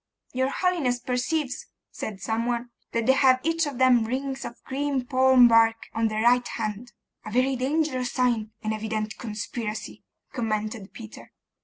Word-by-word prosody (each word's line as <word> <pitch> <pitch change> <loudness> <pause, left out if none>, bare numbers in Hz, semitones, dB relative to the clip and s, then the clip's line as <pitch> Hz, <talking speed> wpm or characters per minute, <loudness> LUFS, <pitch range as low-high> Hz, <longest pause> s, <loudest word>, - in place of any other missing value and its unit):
'Your 260 +1 +1
holiness 325 -8 0
perceives,' 255 +3 -2 0.2
said 205 -3 -6
some 220 +5 -2
one, 240 0 -2 0.2
'that 230 -1 -1
they 265 - +5
have 260 -1 +4
each 330 0 +1
of 280 -4 -5
them 255 -2 +5
rings 265 +3 -3
of 235 - -8
green 275 -1 -2
palm 260 -1 +6
bark 230 -1 +5 0.2
on 225 0 +1
their 215 0 -1
right 245 +1 +4
hand.' 220 +2 -4 0.3
'A - - -7
very 255 +4 +2
dangerous 260 -1 0
sign! 240 -4 +1
An 215 0 -1
evident 215 0 -3
conspiracy!' 215 -1 -5 0.3
commented 215 -3 -3
Peter. 220 -2 -11
245 Hz, 155 wpm, -26 LUFS, 220-260 Hz, 0.3 s, palm